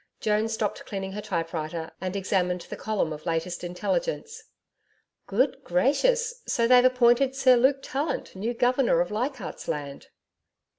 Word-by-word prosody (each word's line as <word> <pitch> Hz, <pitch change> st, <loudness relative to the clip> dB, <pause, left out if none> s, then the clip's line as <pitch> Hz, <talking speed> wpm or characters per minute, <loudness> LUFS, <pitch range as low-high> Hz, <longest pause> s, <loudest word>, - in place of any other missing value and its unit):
Joan 215 Hz, +1 st, +1 dB
stopped 220 Hz, -2 st, -2 dB
cleaning 195 Hz, -1 st, -4 dB
her 210 Hz, +2 st, -5 dB
typewriter 165 Hz, -2 st, -3 dB
and 185 Hz, 0 st, -3 dB
examined 180 Hz, -2 st, 0 dB
the -, -, -8 dB
column 210 Hz, -7 st, -1 dB
of 155 Hz, +3 st, -9 dB
latest 165 Hz, +2 st, -2 dB
intelligence. 455 Hz, -, -3 dB, 0.8 s
'Good -, -, 0 dB
gracious! -, -, +1 dB
So 235 Hz, -1 st, +2 dB
they've 250 Hz, 0 st, +7 dB
appointed 255 Hz, +1 st, +4 dB
Sir 260 Hz, -2 st, +5 dB
Luke 265 Hz, +3 st, +3 dB
Tallant 285 Hz, -4 st, -3 dB
new 225 Hz, +5 st, -3 dB
Governor 245 Hz, -5 st, +2 dB
of 175 Hz, -, -2 dB
Leichardt's 245 Hz, +1 st, -4 dB
Land!' 140 Hz, -2 st, -5 dB
220 Hz, 140 wpm, -26 LUFS, 180-260 Hz, 0.8 s, they've